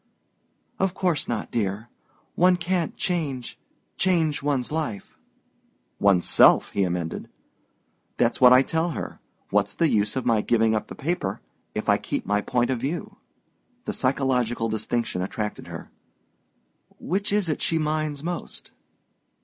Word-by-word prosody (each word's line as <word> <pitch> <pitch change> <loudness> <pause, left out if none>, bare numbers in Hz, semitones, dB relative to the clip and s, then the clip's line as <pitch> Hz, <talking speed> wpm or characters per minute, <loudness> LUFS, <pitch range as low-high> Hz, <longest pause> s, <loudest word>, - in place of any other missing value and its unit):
"Of 190 -1 +1
course 175 -6 0
not, 115 -2 -3
dear. 105 0 -2 0.5
One 180 +1 +4
can't 175 -1 -1
change 145 -9 -2 0.4
change 165 -5 +2
one's 140 -3 -1
life...." 145 -11 -3 0.8
"One's 100 -3 +3
self," - - +5
he 100 - 0
emended. 85 -3 -2 0.9
"That's 120 +1 +1
what 125 -1 +9
I 130 +1 +7
tell 165 +4 0
her. - - -6 0.3
What's 100 0 +1
the 165 - +3
use 105 -1 +1
of 130 - -2
my 115 -3 +3
giving 115 0 +2
up 110 - -1
the - - -9
paper 135 - -2 0.4
if - - -3
I - - +4
keep - - -3
my 105 0 +1
point 120 +2 0
of 125 - -1
view?" 140 +8 -4 0.7
The - - -2
psychological 125 -3 +1
distinction 110 -2 -1
attracted 105 +3 -4
her. - - -9 1.1
"Which 195 +4 -1
is 205 -3 +2
it 155 - -1
she 165 - +1
minds 155 -2 -1
most?" 175 0 -5
130 Hz, 140 wpm, -25 LUFS, 110-160 Hz, 1.1 s, what